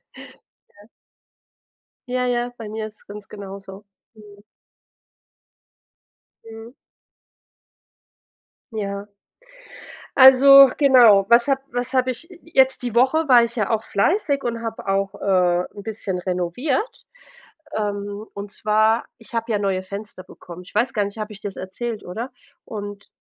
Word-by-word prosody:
ja. - - -16 1.5
Ja, 250 0 -1
ja, 245 0 -1
bei 225 -2 -8
mir 220 0 -5
ist 215 -1 -15
es - - -21
ganz 205 -1 -10
genauso, 195 -1 -10 0.3
mhm. 205 -2 -17 2.0
Mhm. 225 +2 -12 2.0
Ja. 200 -2 -5 1.1
Also 275 +1 +9
genau, 240 -8 +6
was 235 +2 +5
habe 270 -1 +1
was 245 +1 -3
habe 255 -1 +2
ich 330 +8 -10
jetzt 265 -5 +2
die 240 -2 -4
Woche 270 +6 +3
war 245 -3 +6
ich 235 +1 -4
ja 210 -3 0
auch 225 -1 0
fleißig 280 - 0
und 235 -1 -3
habe 225 -3 -6
auch, 195 0 0
äh, 180 -2 +1
'n 205 - -9
bisschen 205 -4 -4
renoviert, 195 - -3 0.7
ähm, 205 0 -4
und 200 0 -7
zwar, 215 +2 +2
ich 225 0 -15
habe 230 0 -2
ja 210 - +1
neue 195 -2 -1
Fenster 200 0 -9
bekommen. 180 -1 -12
Ich 180 - -16
weiß 235 +4 +1
gar 210 - +1
nicht, 200 +2 -8
habe 215 0 -6
ich 205 - -13
dir 205 - -4
das 195 - -14
erzählt, 215 +4 -6
oder? 230 +8 -6 0.3
Und, 205 -2 -8
220 Hz, 140 wpm, -21 LUFS, 200-245 Hz, 2.0 s, Also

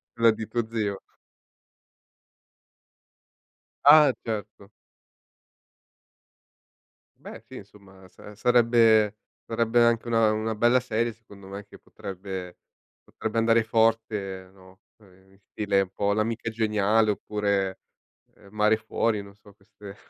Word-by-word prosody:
quella 115 -1 +4
di 110 0 -6
tuo 120 -2 -2
zio. 105 -4 -3 2.9
Ah, 145 -2 +7
certo. 105 -3 -6 2.6
Beh - - -9
sì, - - -12
insomma 95 -2 -15
sa 105 +3 -14
sarebbe 115 -2 +3 0.3
sarebbe 115 +1 +1
anche 115 0 +2
una 115 -2 +3
una 110 +1 -2
bella 120 +3 +3
serie 115 -1 -2
secondo 100 -3 -16
me, 100 +1 -8
che - - -16
potrebbe 95 -3 -8 0.4
potrebbe 110 +1 -6
andare 115 0 +3
forte, 110 -4 -1
no, 95 0 -20 0.2
uhm, 95 -2 -23
in 95 - -24
stile 100 0 -1
un 95 - -4
po' 100 +1 -1
L'Amica 110 +2 -2
Geniale 110 -1 +1
oppure, 100 -2 -2 0.6
uhm, 100 - -19
Mare 105 0 +2
Fuori, 110 0 -2
non 100 0 -15
so 105 0 -20
queste 100 0 -14
110 Hz, 115 wpm, -25 LUFS, 100-115 Hz, 2.9 s, Ah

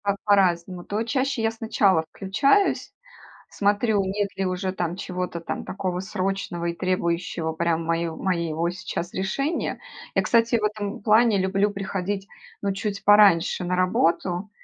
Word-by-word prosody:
Так 200 -1 +1
по-разному: 180 -3 +2
то 210 +4 -2
чаще 260 +1 -1
я 225 - +2
сначала 205 -6 +2
включаюсь, 275 - +1 0.6
смотрю, 205 0 +1
нет 200 +1 -1
ли 195 - 0
уже 185 +1 -2
там 175 -2 -3
чего-то 180 -2 -4
там - - -5
такого 185 -2 -3
срочного 190 -3 -3
и 170 0 -1
требующего 170 -2 -1
прям 165 0 0
мой 165 0 0
моего 170 -2 -1
сейчас 180 -1 -5
решения. 275 - -2 0.4
Я, - - +4
кстати, 230 0 +3
в - - -6
этом 210 -1 -2
плане 215 0 +4
люблю 195 +2 +1
приходить, 195 0 -3 0.3
ну, 200 - 0
чуть 200 +1 -4
пораньше 200 -4 +5
на 180 +1 -1
работу, 180 +1 +1
190 Hz, 145 wpm, -24 LUFS, 175-205 Hz, 0.6 s, пораньше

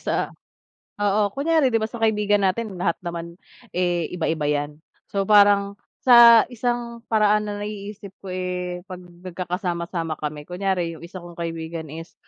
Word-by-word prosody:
sa - - -1 0.7
oo, 205 0 +2
kunyari 285 -2 +2
'di 225 - +2
ba, 220 - -1
sa 240 - -7
kaibigan 210 -2 +2
natin, 195 +1 -1
lahat 170 -1 +1
naman, 170 -1 -6 0.4
eh, 175 -2 0
iba-iba 160 -3 -1
'yan. 145 0 -1 0.3
So, 195 -1 -1
parang 200 -1 +5 0.3
sa 235 -2 +9
isang 240 0 -2
paraan 210 -1 +3
na 205 - -4
naiisip 205 -1 -7
ko, 195 - -8
eh, 180 -1 -4
'pag 185 -2 -9
nagkakasama-sama 175 -1 -4
kami 150 -1 -5
kunyari 180 -1 -1
yung 160 - -12
isa 170 +2 -9
kong 175 -1 -10
kaibigan 165 -1 -5
is 165 +3 -9
185 Hz, 150 wpm, -23 LUFS, 170-210 Hz, 0.7 s, sa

